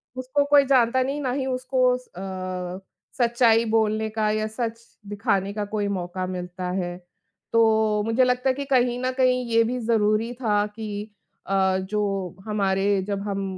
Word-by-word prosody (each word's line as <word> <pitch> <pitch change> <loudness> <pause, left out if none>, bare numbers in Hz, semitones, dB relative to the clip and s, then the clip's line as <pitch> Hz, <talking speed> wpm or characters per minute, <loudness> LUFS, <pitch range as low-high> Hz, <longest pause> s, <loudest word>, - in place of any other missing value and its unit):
उसको 260 +3 0
कोई 285 -1 +7
जानता 260 -1 +3
नहीं 275 +3 -2
ना 255 - -1
ही 265 +1 -2
उसको 255 0 0
अ, 185 -5 -6 0.4
सच्चाई 235 -2 +3
बोलने 220 -1 +1
का 215 -1 0
या 215 0 -1
सच 230 +1 -4 0.3
दिखाने 200 -2 -1
का 210 0 -3
कोई 205 0 -2
मौका 185 -1 -3
मिलता 180 0 -5
है, 175 -1 -3 0.6
तो 220 -2 +3
मुझे 225 +3 +3
लगता 250 +1 +1
है - - +3
कि 280 +1 -4
कहीं 250 -2 +2
न 255 - +1
कहीं 255 -1 +2
ये 230 0 +4
भी 245 +2 -2
ज़रूरी 225 0 +1
था 210 -3 +2
कि 210 -1 -6 0.4
अ, 190 -1 +2
जो 195 -2 -2
हमारे 200 -1 +1
जब 200 -1 -2
हम 200 -1 -2
215 Hz, 165 wpm, -24 LUFS, 195-250 Hz, 0.6 s, कोई